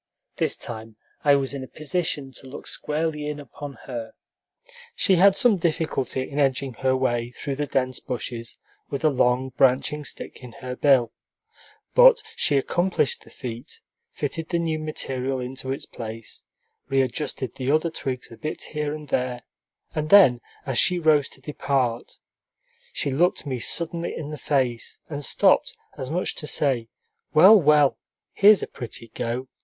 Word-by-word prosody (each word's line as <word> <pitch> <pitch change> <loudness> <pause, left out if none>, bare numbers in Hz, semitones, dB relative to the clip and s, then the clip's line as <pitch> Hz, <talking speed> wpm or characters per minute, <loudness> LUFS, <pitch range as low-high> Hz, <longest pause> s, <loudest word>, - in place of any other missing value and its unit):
This - - 0
time 110 -1 -8 0.3
I 145 -1 +6
was 135 -1 -1
in 135 -1 -5
a - - -8
position 155 -3 -2
to 130 +1 -10
look 130 - -9
squarely 150 0 -2
in 150 0 -4
upon 145 0 -8
her. 120 -4 -6 0.8
She 190 -4 +3
had 195 +2 +6
some 225 -3 +4
difficulty 155 -6 -1
in 145 - -4
edging 135 -1 +1
her 130 0 +2
way 120 -2 0
through 135 +2 -5
the 145 0 -1
dense 130 -2 0
bushes 120 -2 -5 0.3
with 140 +2 -3
a 155 - +5
long, 125 0 +2
branching 135 +3 +2
stick - - -7
in 125 -2 -10
her 125 0 -6
bill; 130 -5 +4 0.8
but - - +7
she 145 - +2
accomplished 175 0 0
the - - -17
feat, 120 -2 -8 0.3
fitted 155 +3 -4
the 170 - +1
new 165 -2 -1
material 135 -4 -3
into 130 +1 -4
its 135 - -3
place, 115 -1 -8 0.5
readjusted 135 0 -1
the 130 0 -3
other 155 +3 +2
twigs 130 -6 -5
a 115 - -11
bit 155 0 -4
here 150 -1 -2
and 150 -2 -10
there, 125 -1 -1 0.5
and 155 0 -2
then, 155 -13 +7 0.2
as 135 -4 0
she 180 - +4
rose 155 -4 +3
to 130 - -17
depart, 130 -4 -1 0.8
she 140 - -2
looked 170 +4 +1
me 130 -3 -3
suddenly 170 +6 -1
in 150 -1 -5
the 150 - -5
face 130 -5 -1
and 145 0 -4
stopped, - - +3 0.2
as 130 - -6
much 175 +4 -1
as - - -7
to 150 - -5
say, 130 -8 0 0.5
"Well, 185 +8 +9
well! 150 -2 +4 0.3
here's 205 -1 +6
a - - -3
pretty 115 -2 -8
go! 120 +4 -3
140 Hz, 165 wpm, -24 LUFS, 125-155 Hz, 0.8 s, Well